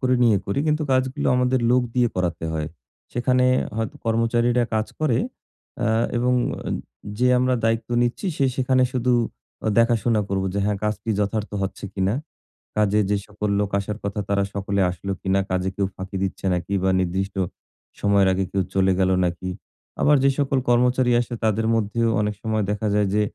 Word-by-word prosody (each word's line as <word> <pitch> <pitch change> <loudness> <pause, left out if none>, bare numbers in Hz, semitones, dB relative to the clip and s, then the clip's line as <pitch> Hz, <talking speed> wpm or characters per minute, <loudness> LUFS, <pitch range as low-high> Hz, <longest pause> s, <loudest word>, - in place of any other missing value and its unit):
করে 130 -1 +2
নিয়ে 115 -4 +5
করি। 100 - -1
কিন্তু 150 0 +1
কাজগুলো 130 +2 0
আমাদের 125 0 +2
লোক 125 +1 +4
দিয়ে 125 -1 +3
করাতে 90 -3 -1
হয়। 80 -1 -2 0.5
সেখানে 125 +1 +2 0.3
হয়তো 110 -1 -2
কর্মচারীরা 115 +2 +2
কাজ 110 0 +1
করে। 145 -7 +2 0.6
অ্যা 110 - +1 0.3
এবং 125 +1 +2 0.4
আম - - -1 0.4
যে 125 - +3
আমরা 130 0 +2
দায়িত্ব 115 0 0
নিচ্ছি 120 +11 -1
সে 140 - +2
সেখানে 130 0 +2
শুধু 125 0 +1 0.5
অ - - +3
দেখাশোনা 115 -1 +3
করবো 95 0 -1
যে, - - 0
হ্যাঁ 105 -1 0
কাজ 105 - +1
কি 115 - -3
যথার্থ 105 +1 -1
হচ্ছে 95 +1 -4
কিনা? 95 +1 +1 0.6
কাজে 105 0 +3
যে 105 - +2
সকল 105 0 -3
লোক 105 - 0
আসার 100 +1 -4
কথা 100 +1 -3
তারা 100 0 +2
সকলে 100 0 -1
আসলো 90 +2 -5
কিনা? 95 +1 +1
কাজে 95 0 0
কেউ 100 -1 0
ফাঁকি 95 +1 -6
দিচ্ছে 95 0 -4
নাকি 90 +2 -3
বা 95 - +3
নির্দিষ্ট 95 +2 -2 0.6
সময়ের 100 -1 +3
আগে 95 +1 0
কেউ 95 - +1
চলে 95 0 +3
গেলো 95 0 +3
নাকি? 90 +1 -3 0.5
আবার 150 0 +5
যে 135 - +5
সকল 140 -1 +1
কর্মচারী 125 +1 +3
আসে 120 - -6
তাদের 110 0 +1
মধ্যেও 115 +1 +1
অনেক 105 0 0
সময় 110 -2 0
দেখা 105 +1 -2
যায় 105 -1 +2
যে 105 - +3
110 Hz, 180 wpm, -23 LUFS, 100-120 Hz, 0.6 s, নিয়ে